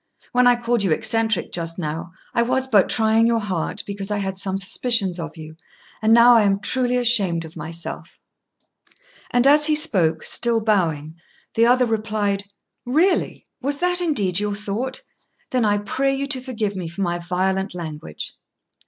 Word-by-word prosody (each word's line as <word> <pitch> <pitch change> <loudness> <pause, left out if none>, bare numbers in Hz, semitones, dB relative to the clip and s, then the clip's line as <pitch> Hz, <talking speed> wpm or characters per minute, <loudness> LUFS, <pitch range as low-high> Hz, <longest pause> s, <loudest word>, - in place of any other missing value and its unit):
When 250 0 +4
I 245 - +6
called 240 -1 0
you 195 - +1
eccentric 220 +3 0
just 165 -1 -4
now, 165 0 -5 0.2
I - - +2
was 255 +2 0
but 210 -7 +3
trying 225 0 +3
your 235 0 +2
heart, 190 -6 -3
because 200 0 -6
I 210 - -1
had 195 -1 -3
some 190 0 -3
suspicions 195 -2 0
of 165 -1 -7
you; 155 0 -11 0.4
and 220 0 +2
now 235 +1 +7
I 230 - +6
am 200 -1 +2
truly 250 +3 +1
ashamed 200 -9 +3
of 160 - -13
myself." 165 +1 -7 1.1
And 245 +1 +2
as 295 +2 +6
he 305 - +3
spoke, 180 - +2
still 235 -1 0
bowing, 165 -8 -1 0.4
the 230 +1 +3
other 250 +1 +4
replied, 215 -3 -2 0.4
"Really! 330 +9 0 0.2
was 280 +2 -1
that 360 0 +3
indeed 205 - 0
your 205 0 -2
thought? 215 - -4 0.5
Then 250 -3 +1
I 205 -1 +2
pray 270 +7 -1
you 275 +1 -2
to 265 -3 -1
forgive 220 -6 -3
me 180 -3 -5
for 170 +4 -4
my 175 -1 -1
violent 190 +2 -2
language." 155 - -7
210 Hz, 170 wpm, -21 LUFS, 180-245 Hz, 1.1 s, now